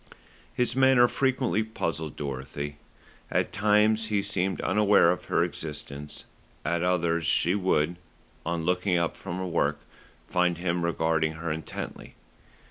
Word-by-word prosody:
His 125 -1 0
manner 130 -2 +6
frequently 130 -4 +1
puzzled 85 -8 -3
Dorothy. 70 +1 -5 0.5
At - - 0
times 105 +1 +3
he 105 -2 0
seemed 95 -1 -1
unaware 105 -3 +4
of 90 - -4
her - - +2
existence; 75 -2 -6 0.4
at 85 +2 0
others 85 -2 +1
she 85 +3 +2
would, 90 -4 +1 0.5
on 85 -1 -2
looking 90 +1 +1
up 85 -1 0
from 90 -2 -6
her 95 - -3
work, 85 -2 0 0.5
find 90 -1 +1
him 85 0 -1
regarding 80 -2 +1
her 80 0 -4
intently. 80 +1 -6
90 Hz, 130 wpm, -27 LUFS, 80-105 Hz, 0.5 s, manner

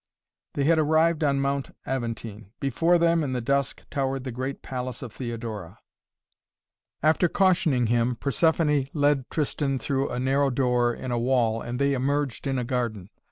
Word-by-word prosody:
They 140 - 0
had 160 +2 +4
arrived 160 +1 +3
on 140 -2 +2
Mount 140 0 -2
Aventine. 115 -5 -5
Before 165 +6 +2
them, 170 -1 +3
in 135 -3 -2
the 125 - -1
dusk, 140 +2 -1
towered 135 -2 -1
the 130 - -4
great 130 +3 -5
palace 130 -1 -5
of 120 -3 -8
Theodora. 115 -7 -6 1.3
After 160 +3 +3
cautioning 165 -10 +2
him, 120 +2 +1
Persephoné 150 0 +1
led 145 -3 +2
Tristan 145 -2 -1
through 135 +1 -1
a 120 - -3
narrow 135 +2 +2
door 125 -2 +2
in 130 +1 -5
a 120 - 0
wall 120 -2 +1
and 120 +1 -4
they 140 +1 +2
emerged 140 0 -1
in 135 -1 0
a 125 - -1
garden. 115 -6 -3
135 Hz, 160 wpm, -26 LUFS, 120-145 Hz, 1.3 s, had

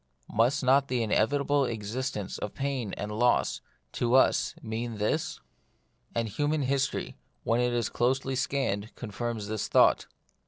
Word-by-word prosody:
Must 120 +6 +2
not 135 +2 +4
the 125 -3 0
inevitable 140 +6 +2
existence 115 -1 -3
of 105 - -5
pain 135 -6 -2
and 105 +1 -4
loss, 120 +3 +2 0.3
to 120 +1 +1
us, 130 - +3
mean 115 0 -4
this? 105 0 -1 0.8
And 115 -1 0
human 145 +7 0
history, 135 +1 -1 0.3
when 115 +1 +2
it 125 0 +1
is 120 -2 0
closely 130 +2 0
scanned, 125 -6 -1
confirms 115 -1 -4
the 110 +1 -3
thought. - - +4
120 Hz, 140 wpm, -28 LUFS, 110-135 Hz, 0.8 s, not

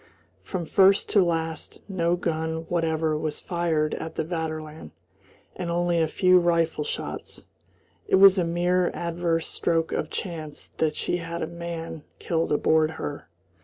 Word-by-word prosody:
From 180 -3 -4
first 195 +4 +4
to 200 -3 +5
last 165 -2 -2
no 175 -3 +1
gun 160 -1 -2
whatever 160 -2 +1
was 155 0 -3
fired 165 -4 0
at 160 0 -5
the - - -1
Vaterland, 155 - -5 0.7
and 175 - -4
only 175 0 +1
a 160 - +2
few 180 +3 +4
rifle 165 -3 +1
shots. - - -6 0.6
It - - +4
was 195 0 +7
a - - +2
mere 175 +1 +1
adverse 170 -1 -1
stroke 165 -1 0
of 155 - -2
chance 160 -5 -6
that 155 -1 +1
she 175 - -1
had 170 0 -4
a - - 0
man 170 -2 -6
killed 165 -1 -1
aboard 155 +1 +3
her. 145 - -6
165 Hz, 150 wpm, -25 LUFS, 160-175 Hz, 0.7 s, was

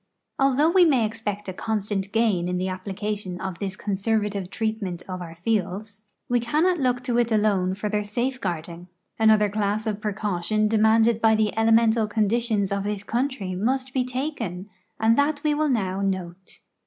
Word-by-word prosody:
Al 270 -1 +3
though 305 +4 +4
we 370 0 +6
may 270 -9 +4
ex{)ect 210 -2 -5
a 185 - -4
constant 205 -1 -2
gain 215 -6 +1
in 180 - -1
the 185 - -1
api)lication 190 0 -4
of 190 -3 -5
this 195 -2 -3
conservative 205 -1 -1
treatment 220 -6 -3
of 185 -1 -5
our 165 -1 -8
fields, 205 +2 -3 0.2
we 245 0 +2
cannot 315 +9 +1
look 250 -2 0
to 240 -2 +1
it 235 -1 +1
alone 200 -4 +2
for 210 +2 -3
their 210 0 0
safeguarding. 190 -7 -3 0.3
Another 215 -1 +5
class 210 +1 -1
of 215 -1 -2
])recaution 210 0 0
demanded 220 +1 +3
b\" 220 -1 +5
the 215 -1 0
elemental 225 0 +3
conditions 215 -1 0
of 200 0 -1
this 205 -1 -3
country 235 -5 -2
must 255 +7 -1
be 260 - +1
taken, 250 - -4 0.3
and 225 +3 +3
that 290 +1 +1
we 300 -1 +2
will 305 0 +1
now 195 -6 0
note. 185 -2 -4
215 Hz, 170 wpm, -24 LUFS, 195-235 Hz, 0.3 s, we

